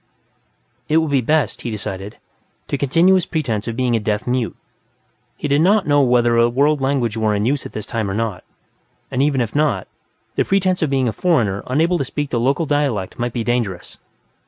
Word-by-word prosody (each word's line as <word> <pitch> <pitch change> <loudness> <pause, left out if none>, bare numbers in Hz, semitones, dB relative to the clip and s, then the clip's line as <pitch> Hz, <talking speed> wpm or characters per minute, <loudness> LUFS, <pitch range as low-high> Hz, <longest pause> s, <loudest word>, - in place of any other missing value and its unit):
It 155 - +3
would 160 -2 +1
be 135 -2 +3
best, 150 +3 0
he 120 - -4
decided, 100 -2 -5 0.5
to - - 0
continue 165 +7 +3
his 185 -2 +2
pretense 120 -11 -2
of 115 - -3
being 125 -1 +1
a - - +2
deaf 105 0 -2
mute. 125 -2 -1 0.8
He - - -3
did 145 +1 +2
not 195 +3 +3
know 145 -1 +4
whether 120 -2 +3
a 115 0 +4
world 140 +4 +2
language 130 -5 0
were 110 -1 +1
in 105 +1 0
use 140 +2 0
at - - -17
this 105 - -5
time 110 -3 -2
or 95 - -3
not, 110 -4 -3 0.7
and 130 0 0
even 140 -2 +2
if 115 -2 -2
not, 150 0 +1 0.5
the - - +3
pretense 185 -2 +1
of 160 - +1
being 135 -2 +1
a 110 - -1
foreigner 115 - +1
unable 165 +7 +1
to - - +1
speak 145 +2 -4
the 120 - 0
local 140 +7 +1
dialect 140 -10 -1
might 120 0 -1
be 115 -1 -3
dangerous. 115 -6 -3
130 Hz, 205 wpm, -19 LUFS, 115-150 Hz, 0.8 s, know